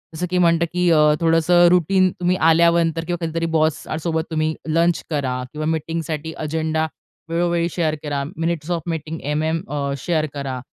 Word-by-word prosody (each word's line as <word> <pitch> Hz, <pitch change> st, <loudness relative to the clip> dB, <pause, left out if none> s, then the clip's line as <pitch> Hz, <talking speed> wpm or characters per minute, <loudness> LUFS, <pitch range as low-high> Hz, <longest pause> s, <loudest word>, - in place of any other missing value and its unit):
जसं 175 Hz, +3 st, -2 dB
की 180 Hz, -, 0 dB
म्हणतं, 170 Hz, -1 st, +3 dB
की 180 Hz, 0 st, +2 dB
अ, 160 Hz, -, +5 dB, 0.2 s
थोडंसं 165 Hz, +2 st, +4 dB
रुटीन 185 Hz, +2 st, +3 dB
तुम्ही 180 Hz, 0 st, +1 dB
आल्यानंतर 165 Hz, 0 st, +3 dB
किंवा 175 Hz, -1 st, -3 dB
कधीतरी 165 Hz, +1 st, -2 dB
बॉससोबत 160 Hz, +1 st, -1 dB
तुम्ही 155 Hz, 0 st, 0 dB
लंच 165 Hz, +1 st, +1 dB
करा 130 Hz, -5 st, -2 dB
किंवा 155 Hz, 0 st, -4 dB
मीटिंगसाठी 160 Hz, 0 st, -3 dB
एजेंडा 160 Hz, +1 st, -1 dB, 0.4 s
वेळोवेळी 170 Hz, 0 st, 0 dB
शेअर 160 Hz, -2 st, 0 dB
करा. 145 Hz, -2 st, -2 dB
Minutes 165 Hz, 0 st, -2 dB
of 170 Hz, -1 st, 0 dB
meeting 160 Hz, 0 st, -4 dB
MM 155 Hz, +3 st, -1 dB
a, 140 Hz, -1 st, -2 dB
share 155 Hz, +3 st, 0 dB
करा. 135 Hz, -3 st, -4 dB
160 Hz, 155 wpm, -21 LUFS, 155-170 Hz, 0.4 s, अ